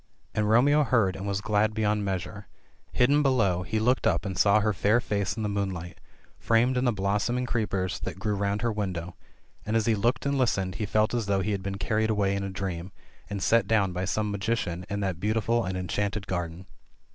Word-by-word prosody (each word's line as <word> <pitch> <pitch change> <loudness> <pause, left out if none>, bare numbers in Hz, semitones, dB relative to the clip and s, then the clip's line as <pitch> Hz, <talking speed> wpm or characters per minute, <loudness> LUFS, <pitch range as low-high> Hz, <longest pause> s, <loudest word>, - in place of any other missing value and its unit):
And 105 -1 0
Romeo 140 +7 +5
heard 115 -9 +2
and 95 +1 -5
was 100 0 -1
glad 105 +1 +1
beyond 105 -1 +1
measure; 95 -3 -4 0.4
hidden 140 +4 +3
below, 110 -11 +2
he 110 +5 -2
looked 125 +4 +2
up 85 +3 +1
and 95 -2 -3
saw 100 +4 +4
her 105 0 +1
fair 105 +6 +3
face 100 -2 -2
in 110 - -2
the - - 0
moonlight, 95 -4 -3 0.4
framed 120 +3 +2
in 125 +1 +1
the 125 - +3
blossoming 105 +5 0
creepers 100 -6 -1
that - - -5
grew 105 +2 -1
round 100 +2 -1
her 120 - +1
window, 90 -4 -4 0.5
and 110 - -2
as 110 -1 +2
he 115 - +3
looked 115 +5 0
and 140 -1 0
listened, 95 -7 +1
he 105 - -1
felt 110 +3 +1
as 115 -4 -1
though 100 -1 +1
he 105 +3 -1
had 100 -2 -2
been 95 0 -4
carried 110 +3 0
away 100 -2 +1
in 100 - -2
a 100 - -3
dream, 95 -1 -5 0.4
and 100 -2 -3
set 115 0 +3
down 100 -5 +2
by 90 +2 -2
some 105 +2 -1
magician 100 -3 -2
in 100 0 -2
that 95 -4 -2
beautiful 115 +3 +1
and 95 0 -3
enchanted 100 +2 -2
garden. 90 0 -4
105 Hz, 215 wpm, -27 LUFS, 95-110 Hz, 0.5 s, Romeo